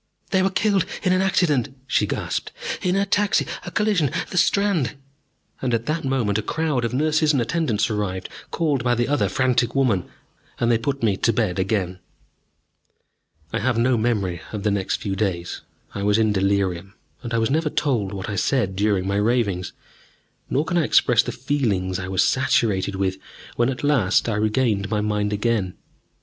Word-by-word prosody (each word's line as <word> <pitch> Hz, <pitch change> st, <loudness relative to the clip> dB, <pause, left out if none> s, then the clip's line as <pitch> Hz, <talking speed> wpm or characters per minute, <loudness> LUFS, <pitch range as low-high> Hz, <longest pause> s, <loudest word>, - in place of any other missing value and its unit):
"They 190 Hz, -, +3 dB
were 190 Hz, -, +2 dB
killed 195 Hz, -1 st, +1 dB, 0.2 s
in 185 Hz, -2 st, +3 dB
an 185 Hz, -, +2 dB
accident," 145 Hz, -8 st, +1 dB
she -, -, +1 dB
gasped, -, -, -3 dB, 0.3 s
"in 180 Hz, 0 st, +1 dB
a 200 Hz, 0 st, +2 dB
taxi 205 Hz, 0 st, +2 dB, 0.2 s
a -, -, -6 dB
collision 195 Hz, -7 st, +1 dB, 0.2 s
the 180 Hz, -, -3 dB
Strand 195 Hz, -, +2 dB, 0.3 s
!" -, -, -38 dB
And 125 Hz, -3 st, +1 dB
at 115 Hz, 0 st, -3 dB
that 155 Hz, +2 st, -1 dB
moment 120 Hz, -6 st, 0 dB
a -, -, -1 dB
crowd 150 Hz, +1 st, -1 dB
of 115 Hz, -, -1 dB
nurses 155 Hz, +3 st, +2 dB
and 140 Hz, -, +2 dB
attendants 120 Hz, -5 st, 0 dB
arrived, 100 Hz, -4 st, -3 dB, 0.2 s
called 150 Hz, -7 st, 0 dB
by 120 Hz, -1 st, +2 dB
the 120 Hz, 0 st, 0 dB
other 145 Hz, +1 st, +1 dB
frantic 125 Hz, -2 st, +1 dB
woman, 115 Hz, -10 st, +1 dB, 0.5 s
and 120 Hz, 0 st, +2 dB
they 115 Hz, -, +3 dB
put 140 Hz, +2 st, -3 dB
me 100 Hz, -4 st, +2 dB
to 115 Hz, -, +2 dB
bed 105 Hz, -6 st, 0 dB
again. 95 Hz, -2 st, -1 dB, 1.5 s
I -, -, 0 dB
have 120 Hz, +1 st, 0 dB
no 120 Hz, +2 st, +3 dB
memory 105 Hz, -7 st, -1 dB
of 105 Hz, -2 st, -5 dB
the 105 Hz, -, +2 dB
next 100 Hz, -2 st, 0 dB
few 100 Hz, -2 st, -3 dB
days. 95 Hz, -4 st, -2 dB, 0.3 s
I 100 Hz, -, -4 dB
was 105 Hz, +1 st, +2 dB
in 110 Hz, -2 st, +2 dB
delirium, 100 Hz, -1 st, 0 dB, 0.3 s
and 120 Hz, -, -6 dB
I -, -, +2 dB
was 115 Hz, +2 st, +1 dB
never 155 Hz, +1 st, +1 dB
told 120 Hz, -11 st, 0 dB
what 95 Hz, -1 st, -5 dB
I 105 Hz, -, -3 dB
said 100 Hz, -2 st, +1 dB
during 100 Hz, -1 st, +1 dB
my 100 Hz, +1 st, 0 dB
ravings. 105 Hz, -4 st, 0 dB, 0.8 s
Nor 145 Hz, +4 st, +1 dB
can 175 Hz, -1 st, +1 dB
I -, -, +2 dB
express 125 Hz, -5 st, +4 dB
the -, -, -4 dB
feelings 110 Hz, -9 st, -1 dB
I 90 Hz, -, -5 dB
was 95 Hz, -1 st, +2 dB
saturated 105 Hz, -7 st, +1 dB
with 95 Hz, -1 st, -1 dB, 0.4 s
when 120 Hz, +1 st, +2 dB
at 130 Hz, +1 st, -4 dB
last 125 Hz, -11 st, +2 dB
I 115 Hz, -, 0 dB
regained 105 Hz, -1 st, +1 dB
my 105 Hz, 0 st, 0 dB
mind 105 Hz, -1 st, -1 dB
again. 105 Hz, -3 st, 0 dB
115 Hz, 190 wpm, -23 LUFS, 100-140 Hz, 1.5 s, express